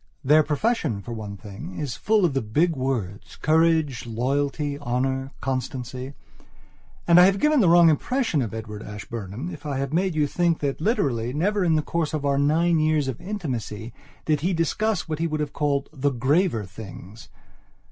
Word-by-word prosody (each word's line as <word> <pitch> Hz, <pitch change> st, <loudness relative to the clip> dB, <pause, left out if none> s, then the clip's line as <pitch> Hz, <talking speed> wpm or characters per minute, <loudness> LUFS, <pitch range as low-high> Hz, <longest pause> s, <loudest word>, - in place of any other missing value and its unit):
Their 150 Hz, +3 st, +6 dB
profession, 150 Hz, -, -1 dB
for 120 Hz, -, -6 dB
one 105 Hz, -3 st, -6 dB
thing, 105 Hz, -, -9 dB
is 140 Hz, -6 st, -3 dB
full 215 Hz, -3 st, +2 dB
of 160 Hz, -, +1 dB
the 135 Hz, -, 0 dB
big 155 Hz, +11 st, +1 dB
words, 110 Hz, -6 st, -3 dB
courage, 155 Hz, -5 st, +2 dB
loyalty, 140 Hz, +5 st, -1 dB
honour, 135 Hz, 0 st, -1 dB
constancy. 130 Hz, 0 st, -4 dB, 0.9 s
And 170 Hz, 0 st, +7 dB
I 180 Hz, -, +9 dB
have 195 Hz, 0 st, +2 dB
given 300 Hz, -3 st, +4 dB
a -, -, +4 dB
wrong 170 Hz, 0 st, +7 dB
impression 165 Hz, -, +1 dB
of 115 Hz, -, -3 dB
Edward 110 Hz, -2 st, -6 dB
Ashburnham 105 Hz, -, -6 dB
if 155 Hz, -, -10 dB
I 145 Hz, -3 st, -3 dB
have 135 Hz, +1 st, -3 dB
made 185 Hz, 0 st, +1 dB
you 150 Hz, -1 st, +3 dB
think 170 Hz, +2 st, +1 dB
that 140 Hz, 0 st, -2 dB
literally 130 Hz, -, 0 dB
never 200 Hz, +7 st, +1 dB
in 165 Hz, -3 st, +3 dB
the 155 Hz, -, +1 dB
course 160 Hz, -1 st, -1 dB
of 145 Hz, -2 st, -3 dB
our 140 Hz, -1 st, +2 dB
nine 160 Hz, +3 st, +3 dB
years 155 Hz, -2 st, +2 dB
of 130 Hz, -3 st, -4 dB
intimacy 125 Hz, -, -5 dB, 0.3 s
did 155 Hz, -2 st, +2 dB
he 180 Hz, +4 st, +1 dB
discuss 180 Hz, +4 st, 0 dB
what 155 Hz, -1 st, -3 dB
he 165 Hz, -, +1 dB
would 155 Hz, -1 st, -2 dB
have 150 Hz, -1 st, -3 dB
called 140 Hz, -2 st, 0 dB
"the 145 Hz, -1 st, 0 dB
graver 135 Hz, -, +1 dB
things." 100 Hz, +1 st, -11 dB
145 Hz, 180 wpm, -24 LUFS, 125-165 Hz, 0.9 s, I